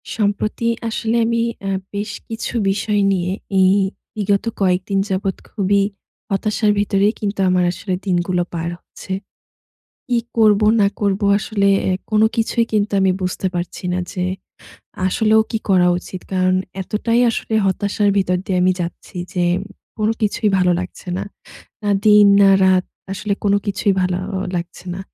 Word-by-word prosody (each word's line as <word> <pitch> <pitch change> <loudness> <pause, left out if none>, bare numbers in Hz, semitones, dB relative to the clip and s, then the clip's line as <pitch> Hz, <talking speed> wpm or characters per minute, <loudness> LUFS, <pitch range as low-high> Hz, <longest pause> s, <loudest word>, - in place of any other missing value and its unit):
সম্প্রতি 215 +2 -1 0.2
আসলে 225 +1 -1
আমি 230 0 +1 0.2
অ্যা 195 0 -2 0.2
বেশ 205 +1 -3 0.2
কিছু 225 0 -4 0.2
বিষয় 205 +1 0
নিয়ে 180 -1 0 0.3
এই 185 0 +5 0.4
বিগত 205 0 0 0.2
কয়েকদিন 190 +1 +1
যাবৎ 190 0 -1
খুবই 200 0 +1 0.5
হতাশার 210 +1 +1
ভিতরে 200 -1 +2
কিন্তু 205 -1 -3
আমার 180 0 +3
আসলে 185 +1 -4
দিনগুলো 180 -1 +1
পার 170 0 -2
হচ্ছে। - - -12 1.0
কি 245 -1 +2 0.2
করব 215 -2 +5 0.2
না 200 - +5
করব 200 -1 +1 0.2
আসলে 200 -1 0 0.2
এ - - +2 0.2
কোন 215 0 +3
কিছুই 230 +1 +1
কিন্তু 210 -1 +1
আমি 190 0 +3
বুঝতে 185 +1 -2
পারছি 175 +1 -4
না 180 - 0
যে 180 - -3 0.8
আসলেও 220 +3 +3
কি 225 - -1
করা 180 -2 +4
উচিত? 180 0 -8
কারণ 185 0 +2 0.3
এতটাই 230 +5 0
আসলে 225 0 -3
হতাশার 200 +2 +1
ভিতর 180 -2 +2
দিয়ে 190 -2 -1
আমি 185 0 +4
যাচ্ছি 175 +2 -6 0.2
যে 180 -1 0 0.5
কোন 215 0 +1
কিছুই 210 +1 +1
ভালো 180 -1 +3
লাগছে 185 +1 -8
না। - - -3 0.6
না 205 - 0
দিন, 210 -1 +7
না 200 - +7 0.2
রাত 185 -1 +4 0.3
আসলে 200 +2 -3
কোন 200 - +3
কিছুই 200 0 +1
ভালো 180 -1 0 0.2
অ - - -1 0.2
লাগছে 175 +1 -6
না। 185 - -6
200 Hz, 155 wpm, -19 LUFS, 185-210 Hz, 1.0 s, দিন